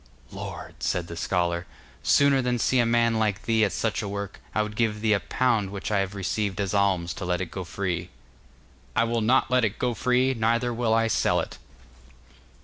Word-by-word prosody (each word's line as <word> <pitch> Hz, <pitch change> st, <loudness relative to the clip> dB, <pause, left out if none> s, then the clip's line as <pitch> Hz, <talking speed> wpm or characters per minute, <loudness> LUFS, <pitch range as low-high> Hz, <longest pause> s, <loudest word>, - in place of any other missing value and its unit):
'Lord!' -, -, -8 dB
said 90 Hz, -1 st, 0 dB
the 85 Hz, -, -8 dB
scholar, 85 Hz, 0 st, -1 dB, 0.3 s
'sooner 140 Hz, -1 st, +4 dB
than 125 Hz, -1 st, 0 dB
see 130 Hz, +2 st, +2 dB
a 120 Hz, -, +3 dB
man 115 Hz, -1 st, +2 dB
like 105 Hz, -3 st, 0 dB
thee 115 Hz, -1 st, +2 dB
at 105 Hz, -, +2 dB
such 115 Hz, -, -1 dB
a 105 Hz, -, -4 dB
work, 100 Hz, -1 st, -5 dB, 0.2 s
I 110 Hz, -, +3 dB
would 105 Hz, 0 st, -6 dB
give 110 Hz, -2 st, 0 dB
thee 110 Hz, -1 st, +3 dB
a 100 Hz, -, +2 dB
pound 115 Hz, -3 st, 0 dB
which 100 Hz, +2 st, -5 dB
I 105 Hz, -, +2 dB
have 95 Hz, +1 st, -2 dB
received 100 Hz, +1 st, -2 dB
as 100 Hz, -1 st, -1 dB
alms 95 Hz, -4 st, +1 dB
to -, -, -7 dB
let 90 Hz, 0 st, 0 dB
it 95 Hz, -3 st, -4 dB
go 95 Hz, -, -5 dB
free.' 90 Hz, -1 st, -3 dB, 0.9 s
'I -, -, +4 dB
will 115 Hz, 0 st, 0 dB
not 120 Hz, +3 st, +3 dB
let 125 Hz, -1 st, +3 dB
it 110 Hz, -1 st, 0 dB
go 125 Hz, -1 st, 0 dB
free, 125 Hz, +3 st, +2 dB
neither 115 Hz, +1 st, +1 dB
will 115 Hz, -1 st, +1 dB
I 115 Hz, 0 st, +3 dB
sell 115 Hz, -, +2 dB
it. -, -, -5 dB
110 Hz, 210 wpm, -26 LUFS, 95-115 Hz, 0.9 s, sooner